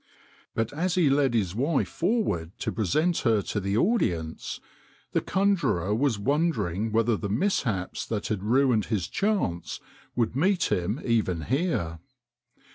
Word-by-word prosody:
But 115 +4 -1
as 175 +4 0
he 165 -7 +4
led 135 -3 +2
his 95 -6 +1
wife 135 +7 +1
forward 170 - -1
to - - -1
present 155 - +1
her 110 -5 +2
to 105 - -2
the 100 +1 -1
audience 85 - 0 0.5
the - - +1
con 200 +1 +2
jurer 100 - 0
was 130 -2 +1
wondering 110 - 0
whether 115 +1 +2
the 100 -1 -4
mishaps 110 - -1
that 105 -2 -3
had 105 -3 -1
ruined 120 0 +3
his 105 -7 -1
chance 195 - -1 0.4
would 120 -1 0
meet 185 +6 +2
him 95 +9 0
even 110 -8 +1
here. 120 - -1
115 Hz, 145 wpm, -27 LUFS, 100-155 Hz, 0.5 s, he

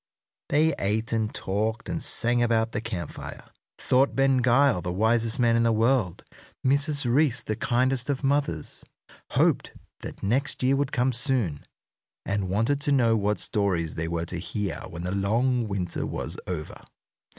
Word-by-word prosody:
They 155 +2 +3
ate 110 +4 -1
and 110 -1 0
talked 110 +4 -2
and - - -3
sang 120 +1 +1
about 115 -1 +1
the 105 - -3
camp 95 -8 -5
fire, - - -9 0.3
thought 130 +2 +2
Ben 135 -1 +3
Gile 125 -4 +3
the 90 - -3
wisest 110 +4 +1
man 120 -2 +3
in 115 - +3
the 115 0 +3
world, 115 -4 +1 0.4
Mrs. 145 +1 +3
Reece 125 -1 +2
the 110 - -3
kindest 125 +3 0
of 140 -1 -1
mothers, 135 - -1 0.5
hoped - - +2 0.3
that - - -9
next 130 +7 0
year 130 +2 +3
would 140 -1 -1
come 125 +1 +1
soon, 120 - -1 0.6
and 95 -1 -2
wanted 115 +9 0
to 145 -1 0
know 120 -5 +3
what 105 0 0
stories 95 -7 0
they 80 0 -3
were 85 0 -2
to 90 +1 -5
hear 95 +4 -4
when 85 0 -7
the 90 - -3
long 115 +5 +1
winter 95 -4 -2
was - - -4
over. 85 -4 -5
115 Hz, 165 wpm, -26 LUFS, 100-130 Hz, 0.6 s, They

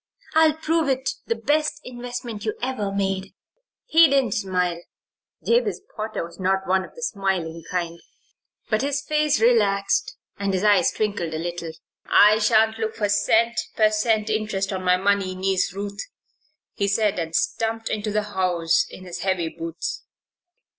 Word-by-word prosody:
"I'll 315 -1 +5
prove 320 -1 0
it 265 0 0 0.2
the 460 - 0
best 300 -2 0
investment 245 -3 -6
you 215 - -2
ever 240 -5 -2
made." 195 -1 -2 0.5
He 330 -8 +6
didn't 270 -5 +2
smile 180 -4 -1 0.6
Jabez 475 +1 +2 0.2
Potter 215 -3 -3
was 170 +1 -13
not 190 +1 0
one 190 +1 +2
of - - -13
the 485 - -8
smiling 185 - -2
kind; 170 -2 -3 0.7
but 215 0 +1
his 280 0 -1
face 300 0 +1
relaxed 205 -4 +2 0.2
and 200 -1 0
his 185 - -1
eyes 205 -2 +4
twinkled 200 -7 -2
a - - -1
little. 170 0 -5 0.3
"I 210 +1 +6
sha'n't 220 +1 +3
look 220 0 -2
for 205 -2 -1
cent. 225 +3 +2
per 215 -1 +4
cent. 215 0 +1
interest 210 -3 -1
on 185 -1 -4
my 180 0 +4
money, 195 -1 +1
Niece 190 0 0
Ruth," 200 +1 -5 0.7
he 200 - -1
said, 205 -1 +1
and 165 -1 -3
stumped 225 0 -1
into 215 0 -2
the 210 0 0
house 175 -3 +1
in 185 - -11
his 175 -1 -7
heavy 185 -4 0
boots. 165 0 -5
205 Hz, 160 wpm, -23 LUFS, 185-230 Hz, 0.7 s, He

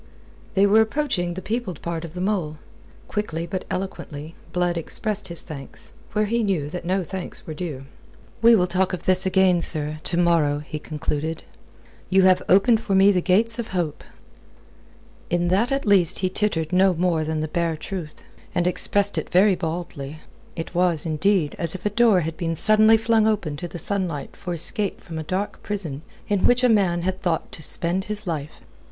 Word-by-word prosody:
They 195 +1 +5
were 210 +2 +5
approaching 220 - -1
the 185 - -6
peopled 215 -7 -3
part 170 -1 -3
of 165 0 -9
the 180 - -4
mole. 180 -6 -1 0.5
Quickly, 170 -6 -3
but 185 +1 -4
eloquently, 165 -5 -5 0.2
Blood 180 -1 0
expressed 210 +5 -3
his 170 -2 -5
thanks, 140 -3 -10 0.2
where 210 0 +2
he 235 +3 0
knew 175 -9 -1
that 180 0 -6
no 185 +1 0
thanks 185 +1 -7
were 160 - -6
due. 150 -5 -6 0.6
"We 230 0 +7
will 180 -4 +3
talk 185 +1 0
of 180 - -4
this 185 0 +3
again, 185 -2 +3
sir 155 -2 +1
to 170 - -1
morrow," 165 -4 +3
he 155 0 -5
concluded. 155 +1 -3 0.7
"You 190 0 +4
have 185 -1 +5
opened 220 +4 +5
for 195 - -1
me 195 +1 +6
the 185 -2 +1
gates 225 +6 +3
of 230 - -3
hope." 175 -5 -3 1.3
In 175 0 +1
that 215 +8 +2
at 275 0 0
least 195 -5 +4
he - - +1
tittered 180 -5 -1
no 185 0 +4
more 170 -2 +1
than 155 0 -2
the 155 - -2
bare 165 0 -1
truth, 170 -2 -7 0.3
and 175 - +1
expressed 200 +3 +1
it - - -7
very 195 +3 +5
baldly. 160 -4 -5 0.4
It 165 0 -6
was, 175 -3 +2
indeed, 160 +1 +1
as 170 +1 +1
if 190 - -9
a 210 - +1
door 220 -4 +4
had 160 0 -4
been 165 -1 -2
suddenly 215 +5 +5
flung 225 -1 +2
open 200 -9 0
to 175 - -5
the 175 - -8
sunlight 175 -5 -2
for 180 - -6
escape 195 +4 0
from 165 -2 -7
a - - -4
dark 185 +6 -3
prison 175 -9 -4 0.3
in 205 -3 +2
which 245 +1 +3
a 250 - +5
man 185 -6 +2
had 190 +1 -2
thought 170 -3 -1
to - - -9
spend 175 +5 -1
his 210 0 -4
life. 155 -4 -5
180 Hz, 190 wpm, -23 LUFS, 165-200 Hz, 1.3 s, We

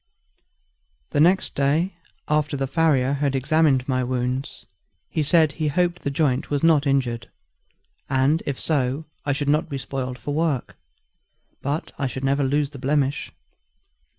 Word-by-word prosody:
The - - +1
next 180 +5 +3
day 150 +7 +1 0.3
after 150 -1 +1
the 135 - 0
farrier 140 -2 +2
had 140 -1 0
examined 135 -1 +2
my 130 -1 +1
wounds, 125 +1 -3 0.5
he 155 - 0
said 155 0 +4
he 155 +1 -2
hoped 175 +3 0
the - - -1
joint 140 -3 0
was 145 0 -1
not 155 -3 +4
injured; 120 -4 0 0.8
and 135 +4 +2
if 140 -2 -2
so, 140 0 0 0.2
I 145 - +3
should 145 0 -2
not 155 +3 +2
be 140 - -3
spoiled 130 -1 -4
for 145 +5 -4
work, 155 -5 -1 0.9
but 145 +4 -3
I 140 - 0
should 130 +1 -6
never 140 +1 +2
lose 140 +1 +1
the 140 - -9
blemish. 140 +1 0
140 Hz, 150 wpm, -23 LUFS, 130-155 Hz, 0.9 s, said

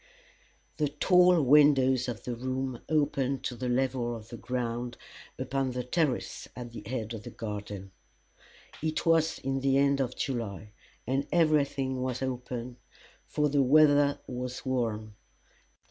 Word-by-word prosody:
The 150 - +1
tall 180 +2 +4
windows 130 -2 +5
of 120 -3 -5
the 125 - -3
room 130 0 -3
opened 140 -3 +1
to 125 - -3
the 125 +1 -3
level 125 -1 0
of 110 -1 -10
the 120 - -7
ground 120 -1 -3 0.4
upon 135 -1 -1
the 125 0 -2
terrace 140 +1 -1
at 120 -1 -7
the 115 - -8
head 115 -2 -3
of 110 - -6
the - - -8
garden. 105 -3 -6 0.9
It 155 +2 -2
was 160 -1 +3
in 135 0 -2
the 135 0 +2
end 140 0 +3
of 125 -1 -2
July, 110 -6 -4 0.3
and 135 +2 -1
everything 140 -5 +2
was 130 0 -2
open, 125 -1 -4 0.5
for 150 0 +1
the 145 -1 +2
weather 145 +1 +5
was 125 0 -5
warm. 110 -5 -2
130 Hz, 145 wpm, -29 LUFS, 120-140 Hz, 0.9 s, windows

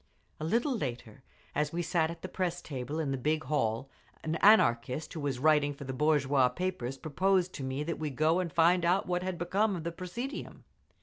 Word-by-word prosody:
A - - -5
little 235 - +1
later, 125 - -5 0.3
as 150 0 0
we 175 +1 -2
sat 165 -2 +1
at 170 0 -8
the - - -3
press 180 -2 -2
table 140 +2 -4
in 150 -4 -1
the 135 - -2
big 155 +4 0
hall, 130 -4 -1 0.4
an 160 - -2
Anarchist 130 - +4
who 160 - -5
was 140 -3 -2
writing 145 +1 +3
for 140 - -9
the 130 -1 -5
bourgeois 140 -2 +3
papers 135 -4 -3
proposed 180 +5 +1
to 135 - -6
me 130 +2 -2
that 170 +2 -4
we 155 -1 -2
go 155 +5 +2
and 180 -3 -2
find 170 +3 +4
out 180 +3 +2
what 180 0 -1
had 185 -1 -3
become 195 +4 +1
of 165 - -5
the 170 - -3
presidium. 210 - -6
155 Hz, 205 wpm, -30 LUFS, 135-180 Hz, 0.4 s, Anarchist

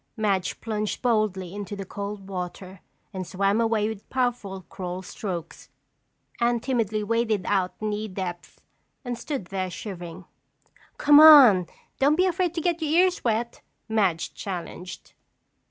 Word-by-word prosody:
Madge 195 -4 0
plunged 215 0 -3
boldly 210 -6 0
into 205 -1 -6
the 195 -1 -6
cold 200 +1 -6
water 185 0 -6 0.3
and 185 -2 -5
swam 200 +3 +1
away 225 -2 +1
with 220 -2 -7
powerful 240 -7 -2
crawl 180 +1 -6
strokes. 180 -3 -6 0.7
Anne 235 0 +2
timidly 225 -4 -1
waded 220 -3 0
out 190 -3 0
knee 215 0 -2
depth 185 -3 -6 0.5
and 245 -1 -3
stood 260 - -5
there 185 -1 -1
shivering. 180 -2 -8 0.7
"Come 290 0 +7
on, 265 - +9 0.3
don't 285 +3 +4
be 365 +3 +3
afraid 360 -1 0
to 330 - -1
get 345 0 0
your 310 - -1
ears 360 +3 +3
wet!" 235 0 -1 0.3
Madge 195 -7 0
challenged. 180 -1 -7
210 Hz, 140 wpm, -25 LUFS, 185-240 Hz, 0.7 s, on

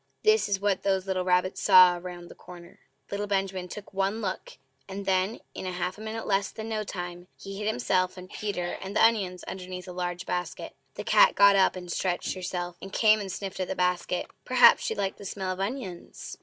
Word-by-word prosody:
This 430 - +4
is 195 -1 +1
what 200 -1 0
those 190 -1 0
little 190 -1 -1
rabbits 180 0 +1
saw 180 -1 +7
round 175 -1 -8
that - - -14
corner! 175 -1 -13 0.3
Little 205 +1 -2
Benjamin 195 -2 -1
took 200 +2 -10
one 195 +3 0
look, 190 -4 -5 0.3
and 195 +1 -6
then, 190 +3 0
in - - -6
half 180 0 -3
a 210 - -12
minute 220 +1 -5
less 195 -1 +1
than 220 0 -7
no 215 -1 -2
time, 175 -2 -6
he 195 0 -8
hid 210 - -3
himself 185 - 0
and 180 0 -9
Peter 185 -4 -4
and 195 +1 -6
the - - +6
onions 195 -6 +1
underneath 185 0 -7
a - - -6
large 175 0 -4
basket.... 180 0 -4 0.2
The - - -5
cat - - +5
got 200 0 +7
up 190 -1 +4
and 180 -1 -7
stretched 180 -1 -1
herself, 180 -1 -4
and 195 - -8
came 215 0 +4
and 195 -2 -5
sniffed 190 +1 -6
at 185 - -1
the - - -3
basket. 180 0 0 0.2
Perhaps 255 -1 +6
she - - -2
liked 195 -1 -2
the - - -9
smell 190 -1 -3
of 185 - -5
onions! 195 -4 -5
190 Hz, 210 wpm, -27 LUFS, 180-200 Hz, 0.3 s, saw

